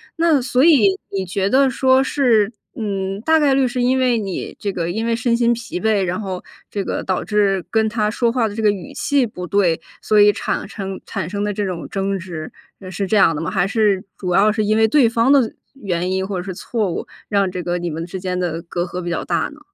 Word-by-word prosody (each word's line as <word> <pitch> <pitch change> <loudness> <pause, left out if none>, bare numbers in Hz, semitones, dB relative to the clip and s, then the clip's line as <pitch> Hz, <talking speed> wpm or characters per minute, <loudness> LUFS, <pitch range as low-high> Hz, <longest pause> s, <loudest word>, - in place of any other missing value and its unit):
那 330 -4 +3
所 250 +1 +2
以 340 +5 +5
你 195 -1 -2
觉 190 +2 -1
得 270 +2 +4
说 260 +1 +3
是， 230 -7 +2 0.2
嗯， 195 -2 -3
大 320 +5 +3
概 285 -3 +3
率 265 -1 +3
是 245 0 -2
因 260 +2 +2
为 250 -2 +2
你 195 -5 -4
这 200 - -2
个 170 -2 -3
因 220 +6 -2
为 230 0 +1
身 235 0 +1
心 235 0 +3
疲 235 -6 -5
惫， 215 0 +2
然 180 +1 -2
后 190 -4 -5 0.3
这 200 -2 -2
个 - - -3
导 185 -1 -1
致 200 -3 +1
跟 220 -1 +2
他 215 -1 0
说 230 +1 +1
话 240 -2 +1
的 205 - -7
这 225 - -3
个 210 - +5
语 190 -5 -7
气 280 -3 +1
不 180 -4 -7
对， 180 -3 +2 0.2
所 215 - +3
以 205 0 +7
产 - - -2
称 195 -2 -6
产 160 - -4
生 205 +1 -3
的 205 0 -1
这 205 0 -2
种 180 -3 -4
争 195 0 -1
执， 170 -4 -7 0.3
呃， 185 - -9
是 195 +2 -3
这 215 - 0
样 170 -5 +5
的 150 - -3
吗？ 165 - -3
还 195 - +1
是 210 -3 +1
主 180 -2 -2
要 210 +3 +5
是 215 0 0
因 215 - +2
为 220 0 +5
对 270 0 +4
方 235 +3 +2
的 265 -6 +4 0.2
原 185 -9 -2
因 190 0 -1
或 195 -1 -3
者 180 - -3
是 190 - -5
错 215 -2 -2
误， - - -4 0.2
让 200 -3 +1
这 180 -1 -4
个 175 +1 -2
你 175 0 -3
们 165 +2 -4
之 185 +1 -6
间 180 0 -3
的 170 -2 -2
隔 175 0 -3
阂 180 0 -5
比 175 - -4
较 170 - -2
大 - - 0
呢？ 300 - -15
205 Hz, 270 characters per minute, -20 LUFS, 185-235 Hz, 0.3 s, 以